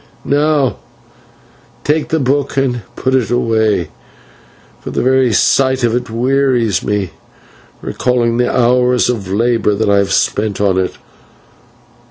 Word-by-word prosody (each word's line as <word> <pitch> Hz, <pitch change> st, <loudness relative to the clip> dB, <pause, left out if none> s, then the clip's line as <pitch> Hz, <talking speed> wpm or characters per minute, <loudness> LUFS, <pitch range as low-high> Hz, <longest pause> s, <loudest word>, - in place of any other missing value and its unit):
"Now 145 Hz, -2 st, +1 dB, 1.1 s
take 150 Hz, +1 st, 0 dB
the 160 Hz, -, 0 dB
book 140 Hz, +1 st, -1 dB
and 125 Hz, -3 st, 0 dB
put 130 Hz, -, -1 dB
it 125 Hz, -5 st, +1 dB
away, 110 Hz, -6 st, 0 dB, 0.9 s
for -, -, -8 dB
the -, -, -2 dB
very 130 Hz, -1 st, +3 dB
sight 130 Hz, +4 st, +2 dB
of 115 Hz, -1 st, +2 dB
it 125 Hz, 0 st, -3 dB
wearies 125 Hz, -3 st, +1 dB
me, 100 Hz, -4 st, -2 dB, 0.7 s
recalling 120 Hz, -2 st, 0 dB
the 125 Hz, 0 st, +1 dB
hours 125 Hz, 0 st, +2 dB
of 105 Hz, -6 st, -5 dB
labour 115 Hz, 0 st, +1 dB
that 105 Hz, 0 st, 0 dB
I 100 Hz, -, +4 dB
have 100 Hz, -, -1 dB
spent 105 Hz, -1 st, 0 dB
on 95 Hz, -2 st, +1 dB
it. 95 Hz, -, -3 dB
120 Hz, 135 wpm, -15 LUFS, 110-130 Hz, 1.1 s, I